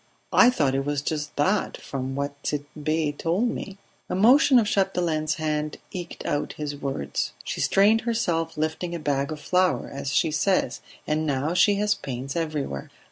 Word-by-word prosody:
"I 245 Hz, -, +7 dB
thought 145 Hz, -, +1 dB
it 135 Hz, 0 st, 0 dB
was 145 Hz, 0 st, -2 dB
just 150 Hz, -1 st, -3 dB
that, 190 Hz, +8 st, +1 dB
from 135 Hz, -1 st, -5 dB
what 140 Hz, 0 st, -4 dB
Tit'Bé 150 Hz, +1 st, -2 dB
told 180 Hz, +11 st, 0 dB
me." 195 Hz, -3 st, -6 dB, 0.3 s
A -, -, -1 dB
motion 255 Hz, +7 st, +6 dB
of 230 Hz, -, +4 dB
Chapdelaine's 175 Hz, -6 st, 0 dB
hand 150 Hz, -1 st, -2 dB
eked 175 Hz, -2 st, -7 dB
out 145 Hz, -, -1 dB
his 150 Hz, -1 st, -4 dB
words. 135 Hz, -, -3 dB
"She -, -, -4 dB
strained 210 Hz, +3 st, +4 dB
herself 175 Hz, -9 st, -1 dB
lifting 160 Hz, +3 st, -2 dB
a -, -, -4 dB
bag 140 Hz, -1 st, -1 dB
of 155 Hz, -, -5 dB
flour, 180 Hz, +4 st, +1 dB
as 140 Hz, 0 st, -4 dB
she 155 Hz, -, +2 dB
says; 155 Hz, -5 st, +1 dB, 0.2 s
and 155 Hz, +1 st, 0 dB
now 145 Hz, +3 st, 0 dB
she 200 Hz, +3 st, +4 dB
has 210 Hz, +1 st, +2 dB
pains 130 Hz, +2 st, -5 dB
everywhere. 155 Hz, -, -3 dB
155 Hz, 170 wpm, -25 LUFS, 145-185 Hz, 0.3 s, I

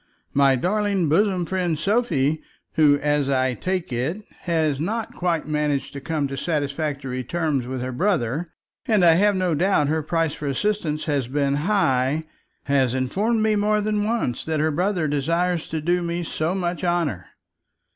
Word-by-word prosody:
My 140 Hz, -1 st, +4 dB
darling 195 Hz, -, 0 dB
bosom 185 Hz, +2 st, +2 dB
friend 175 Hz, -2 st, -1 dB
Sophie, 155 Hz, -, +1 dB, 0.3 s
who, 145 Hz, -2 st, +5 dB
as 145 Hz, -1 st, +1 dB
I 130 Hz, -1 st, +2 dB
take 180 Hz, 0 st, -3 dB
it, 155 Hz, -, -2 dB, 0.2 s
has 160 Hz, -5 st, +1 dB
not 215 Hz, +8 st, -2 dB
quite 170 Hz, -4 st, -1 dB
managed 150 Hz, -2 st, -1 dB
to 140 Hz, -, -6 dB
come 150 Hz, 0 st, -1 dB
to 135 Hz, -, -4 dB
satisfactory 140 Hz, -3 st, -2 dB
terms 150 Hz, -3 st, -1 dB
with 130 Hz, -1 st, -4 dB
her 130 Hz, -, -3 dB
brother, 160 Hz, -, 0 dB, 0.4 s
and 210 Hz, -6 st, +4 dB
I 165 Hz, -, +7 dB
have 205 Hz, +4 st, +3 dB
no 185 Hz, -2 st, +1 dB
doubt 160 Hz, -3 st, +2 dB
her 160 Hz, +1 st, +1 dB
price 165 Hz, 0 st, 0 dB
for 150 Hz, -, -5 dB
assistance 155 Hz, 0 st, -1 dB
has 140 Hz, -5 st, -1 dB
been 140 Hz, +1 st, 0 dB
high, 145 Hz, -7 st, +2 dB, 0.4 s
has 135 Hz, -3 st, +1 dB
informed 210 Hz, -, 0 dB
me 215 Hz, -1 st, +3 dB
more 210 Hz, +1 st, +2 dB
than 210 Hz, 0 st, 0 dB
once 215 Hz, -, -1 dB
that 155 Hz, -1 st, -1 dB
her 155 Hz, +1 st, +2 dB
brother 175 Hz, +1 st, 0 dB
desires 165 Hz, +4 st, 0 dB
to 160 Hz, -, -3 dB
do 175 Hz, +3 st, +1 dB
me 170 Hz, 0 st, -2 dB
so 160 Hz, +2 st, -2 dB
much 175 Hz, -1 st, -2 dB
honour. 170 Hz, -, 0 dB
160 Hz, 165 wpm, -23 LUFS, 140-185 Hz, 0.4 s, I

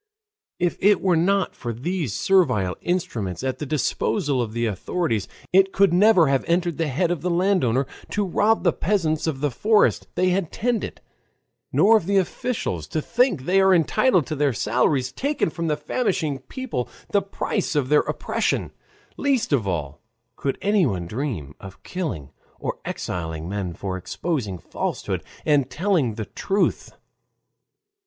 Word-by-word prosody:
If 175 Hz, -1 st, -1 dB
it 205 Hz, +1 st, +5 dB
were 185 Hz, -3 st, +2 dB
not 190 Hz, +3 st, +1 dB
for 120 Hz, -, -4 dB
these 150 Hz, -, -2 dB
servile 105 Hz, -, +2 dB
instruments 110 Hz, -, -2 dB
at 130 Hz, -1 st, -2 dB
the 150 Hz, -, -4 dB
disposal 145 Hz, 0 st, 0 dB
of 115 Hz, -3 st, -3 dB
the 115 Hz, +1 st, -1 dB
authorities, 110 Hz, -, -1 dB, 0.3 s
it 195 Hz, +1 st, +5 dB
could 195 Hz, -3 st, +3 dB
never 185 Hz, -2 st, +6 dB
have 135 Hz, -2 st, +1 dB
entered 170 Hz, -1 st, 0 dB
the 165 Hz, -, +1 dB
head 165 Hz, +6 st, 0 dB
of 175 Hz, -5 st, -2 dB
the 180 Hz, -, -1 dB
landowner 170 Hz, -, +2 dB, 0.2 s
to 205 Hz, 0 st, 0 dB
rob 210 Hz, +4 st, +2 dB
the 175 Hz, -, +3 dB
peasants 165 Hz, -5 st, 0 dB
of 140 Hz, -4 st, -2 dB
the 145 Hz, -2 st, +1 dB
forest 210 Hz, -, +2 dB
they 185 Hz, -, +2 dB
had 180 Hz, -2 st, 0 dB
tended, 235 Hz, -1 st, -2 dB, 0.7 s
nor 220 Hz, +3 st, +6 dB
of 185 Hz, -, -4 dB
the 200 Hz, 0 st, +3 dB
officials 185 Hz, -, -2 dB
to 155 Hz, -, -2 dB
think 235 Hz, -, +1 dB
they 190 Hz, +6 st, +3 dB
are 190 Hz, -1 st, +5 dB
entitled 175 Hz, -, +3 dB
to 155 Hz, -, -4 dB
their 145 Hz, -2 st, +1 dB
salaries, 125 Hz, +5 st, +1 dB
taken 280 Hz, -, -1 dB
from 165 Hz, +1 st, -3 dB
the 150 Hz, -1 st, 0 dB
famishing 160 Hz, -, -1 dB
people, 260 Hz, -, -5 dB, 0.2 s
the 200 Hz, -, +3 dB
price 195 Hz, -2 st, -2 dB
of 135 Hz, -3 st, +1 dB
their 150 Hz, 0 st, +6 dB
oppression; -, -, -1 dB, 0.5 s
least 260 Hz, -, +1 dB
of 115 Hz, -8 st, +1 dB
all 75 Hz, -6 st, -3 dB, 0.3 s
could 135 Hz, -, -2 dB
anyone 170 Hz, -, +2 dB
dream 105 Hz, -, -4 dB
of 95 Hz, -1 st, -12 dB
killing 125 Hz, -, -4 dB, 0.3 s
or -, -, -4 dB
exiling 80 Hz, -2 st, -4 dB
men 95 Hz, -2 st, -3 dB
for 95 Hz, -2 st, -4 dB
exposing 105 Hz, -, -3 dB
falsehood -, -, -3 dB, 0.2 s
and 145 Hz, -4 st, +3 dB
telling 165 Hz, -, +1 dB
the 110 Hz, -1 st, -4 dB
truth. 195 Hz, -, -1 dB
160 Hz, 160 wpm, -23 LUFS, 120-190 Hz, 0.7 s, never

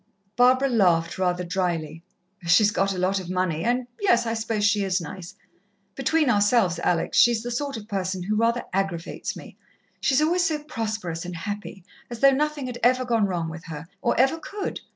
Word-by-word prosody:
Barbara 255 Hz, +2 st, +4 dB
laughed 180 Hz, -9 st, +2 dB
rather 180 Hz, -1 st, 0 dB
drily. 170 Hz, -3 st, -2 dB, 0.5 s
"She's 205 Hz, +5 st, +5 dB
got 195 Hz, -1 st, +1 dB
a 190 Hz, -, -4 dB
lot 185 Hz, +2 st, +1 dB
of 180 Hz, -2 st, -8 dB
money, 180 Hz, -3 st, -1 dB
and 245 Hz, +3 st, 0 dB
yes, 240 Hz, -13 st, +3 dB
I 225 Hz, -, -1 dB
suppose 220 Hz, -2 st, -1 dB
she 205 Hz, 0 st, +2 dB
is 190 Hz, -1 st, 0 dB
nice. 170 Hz, +1 st, -8 dB, 0.6 s
Between 320 Hz, -2 st, +1 dB
ourselves, 205 Hz, -5 st, +3 dB
Alex, 175 Hz, -1 st, +1 dB
she's 235 Hz, -2 st, +4 dB
the 245 Hz, -, -4 dB
sort 275 Hz, +1 st, -3 dB
of 210 Hz, -1 st, -10 dB
person 190 Hz, -2 st, -3 dB
who 210 Hz, +4 st, -1 dB
rather 230 Hz, +2 st, +1 dB
aggravates 190 Hz, -3 st, -3 dB
me. -, -, -12 dB, 0.4 s
She's 270 Hz, 0 st, +2 dB
always 340 Hz, +4 st, +2 dB
so 305 Hz, -3 st, -1 dB
prosperous 215 Hz, -, -4 dB
and 180 Hz, -1 st, -6 dB
happy, 200 Hz, +1 st, -6 dB, 0.3 s
as 240 Hz, -2 st, -7 dB
though 275 Hz, +2 st, +6 dB
nothing 295 Hz, 0 st, -1 dB
had 245 Hz, -1 st, -6 dB
ever 255 Hz, +1 st, +3 dB
gone 230 Hz, -4 st, +2 dB
wrong 175 Hz, -3 st, -2 dB
with 160 Hz, 0 st, -8 dB
her, 160 Hz, -1 st, -7 dB, 0.2 s
or -, -, +1 dB
ever 270 Hz, +6 st, +3 dB
could. 405 Hz, +5 st, -5 dB
210 Hz, 190 wpm, -24 LUFS, 180-245 Hz, 0.6 s, though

